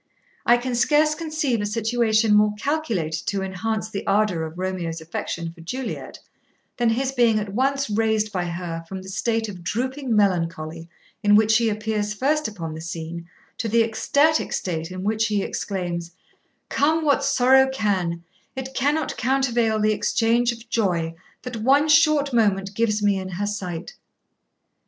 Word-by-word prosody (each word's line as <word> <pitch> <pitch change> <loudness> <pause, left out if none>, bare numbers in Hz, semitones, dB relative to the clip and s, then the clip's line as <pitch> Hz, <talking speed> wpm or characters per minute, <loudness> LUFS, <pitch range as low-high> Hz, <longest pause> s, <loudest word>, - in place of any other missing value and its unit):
I 240 - +7
can 250 +1 -3
scarce 300 +5 +3
conceive 305 -7 -1
a - - -1
situation 220 0 +2
more 210 0 +4
calculated 210 - -2
to 195 -1 -1
enhance 215 +4 -2
the 205 -2 -5
ardour 195 -4 +2
of 160 +2 -12
Romeo's 180 -3 -3
affection 165 +1 -5
for 170 - -15
Juliet 245 +7 -5 0.6
than 240 -1 +2
his 260 +4 0
being 240 -4 +3
at 205 -2 -3
once 275 +4 +1
raised 215 0 +1
by 180 -3 -2
her 170 -1 -5
from 190 -1 -6
the 190 - -9
state 225 +3 -1
of 185 -4 -9
drooping 255 +5 -2
melancholy 165 -4 0 0.3
in 205 -1 +5
which 220 +1 +5
he 230 -1 +2
appears 210 0 -2
first 300 +6 +1
upon 170 -7 -6
the 160 - -7
scene 170 +1 -6 0.3
to 225 - -1
the 230 +1 +4
ecstatic 285 +8 +1
state 165 -2 -3
in 185 0 -6
which 220 +2 +1
he 205 -2 0
exclaims 175 -3 -4 0.5
come 315 +2 +1
what 280 -1 +3
sorrow 265 0 +4
can, 185 -8 -1 0.3
It 265 0 -6
cannot 290 +4 0
countervail 240 -4 +1
the 215 0 +3
exchange 235 +3 +2
of 230 0 -10
joy 180 -8 0 0.3
That 250 -2 -5
one 275 +7 +3
short 300 -3 +4
moment 200 -4 +2
gives 215 -1 0
me 200 -2 +3
in 190 0 -6
her 200 +4 -2
sight.' 185 -5 -5
215 Hz, 160 wpm, -23 LUFS, 185-245 Hz, 0.6 s, I